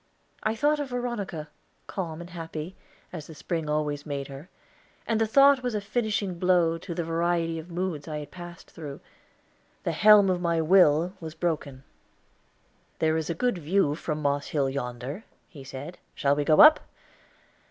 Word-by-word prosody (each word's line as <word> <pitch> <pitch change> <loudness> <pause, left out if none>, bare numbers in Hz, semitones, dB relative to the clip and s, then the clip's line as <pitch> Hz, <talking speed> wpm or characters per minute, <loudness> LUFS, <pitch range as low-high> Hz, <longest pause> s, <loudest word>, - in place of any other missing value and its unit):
I 215 +1 0
thought 295 +6 +2
of 285 -2 -3
Veronica, 235 -11 -4 0.4
calm 170 -4 -5
and 175 +1 -10
happy, 165 0 -6 0.4
as 155 -4 -7
the 160 - -11
spring 160 0 -3
always 150 -1 -1
made 140 -2 -5
her, 140 +6 -10 0.6
and 225 -1 0
the 225 - +3
thought 275 +3 +6
was 245 -3 -2
a - - +1
finishing 205 -4 -2
blow 175 -2 +3
to 170 0 -7
the 170 - -1
variety 165 0 0
of 160 +2 -10
moods 175 -4 -3
I 155 -1 -4
had 150 -1 -8
passed 175 -1 -11
through. 145 -3 -8 0.8
The - - 0
helm 210 -2 +7
of 180 -1 -1
my 170 -1 +1
will 170 0 +4
was 160 -2 -8
broken. 150 -6 -3 1.1
"There 160 0 +1
is 160 0 -2
a 170 - -1
good 245 0 0
view 165 -1 +2
from 150 0 -4
Moss 140 0 0
Hill 140 -3 0
yonder," 130 - -5 0.2
he 145 -7 -12
said. 135 +6 -8 0.2
"Shall 140 0 +2
we 145 0 -1
go 155 - +6
up?" 305 +1 +9
165 Hz, 175 wpm, -27 LUFS, 150-190 Hz, 1.1 s, up